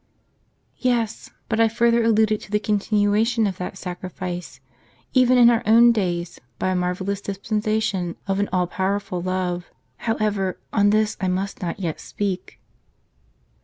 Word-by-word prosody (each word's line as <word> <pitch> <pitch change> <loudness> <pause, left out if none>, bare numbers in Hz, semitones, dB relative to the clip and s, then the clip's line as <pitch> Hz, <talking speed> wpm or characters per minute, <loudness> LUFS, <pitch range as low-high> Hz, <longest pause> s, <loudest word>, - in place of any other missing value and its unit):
" - - -43 0.3
"Yes; 240 -4 -1 0.2
but 220 - -1
I 225 - +6
further 235 +1 +2
alluded 220 -1 +3
to - - -12
the 210 0 +1
continuation 210 +2 +1
of 190 -3 -2
that 180 +1 -5
sacrifice, 180 -1 -6 0.5
even 255 -1 +5
in 240 -1 +8
our 230 - +2
own 235 +2 +7
days, 175 -5 -2 0.2
by 185 - -1
a 185 - 0
marvellous 185 +2 -2
dispensation 210 -2 -1
of 195 0 -1
an 205 - 0
all 180 -1 +2
powerful 190 0 -2
love. 180 -1 -2 0.3
However, 210 -4 -1 0.2
on 205 -1 +4
this 215 +1 +2
I 190 - 0
must 190 +2 -2
not 175 +1 -3
yet 170 -5 -3
speak." 195 -3 -4
200 Hz, 150 wpm, -23 LUFS, 185-220 Hz, 0.5 s, in